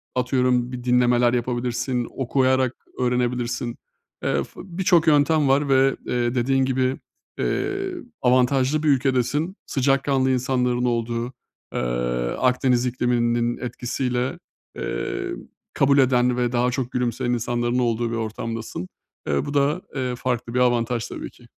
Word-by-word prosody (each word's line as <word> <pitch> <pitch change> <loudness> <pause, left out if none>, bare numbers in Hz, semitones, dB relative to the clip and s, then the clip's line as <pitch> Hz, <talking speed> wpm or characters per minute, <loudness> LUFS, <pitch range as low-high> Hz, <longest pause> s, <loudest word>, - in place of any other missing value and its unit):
atıyorum 125 -1 +1
bir 125 -1 -6
dinlemeler 125 -1 +3
yapabilirsin. 120 0 -1
Okuyarak 130 -1 +2 0.2
öğrenebilirsin. 125 -1 -1 0.5
Eee, - - +1
f - - -15
birçok 180 -2 +2
yöntem 150 0 +4
var 140 +1 +2
ve, 135 0 +4
eee, 120 0 0
dediğin 135 +2 +2
gibi, 130 0 0 0.4
eee, 390 -1 -1 0.3
avantajlı 130 +4 +3
bir 155 - +1
ülkedesin. 135 +5 +1
Sıcakkanlı 135 0 +1
insanların 125 -1 +1
olduğu, 120 +1 -1 0.4
eee, - - -1 0.6
Akdeniz 125 -1 +2
ikliminin 120 -1 +1
etkisiyle, 125 +1 -2 0.4
eee, - - -3 0.4
kabul 140 +1 +3
eden 125 -2 +3
ve 120 -1 +1
daha 125 0 +1
çok 130 -1 -3
gülümseyen 120 -1 -1
insanların 120 +1 0
olduğu 120 -1 0
bir - - -2
ortamdasın. 110 -3 -4 0.4
Eee, 70 -1 0
bu 145 - -5
da, 145 +5 +2
eee, 130 -2 -1
farklı 120 -1 -2
bir 125 - +1
avantaj 120 -1 +1
tabii - - -7
ki. - - -20
125 Hz, 130 wpm, -23 LUFS, 120-135 Hz, 0.6 s, yöntem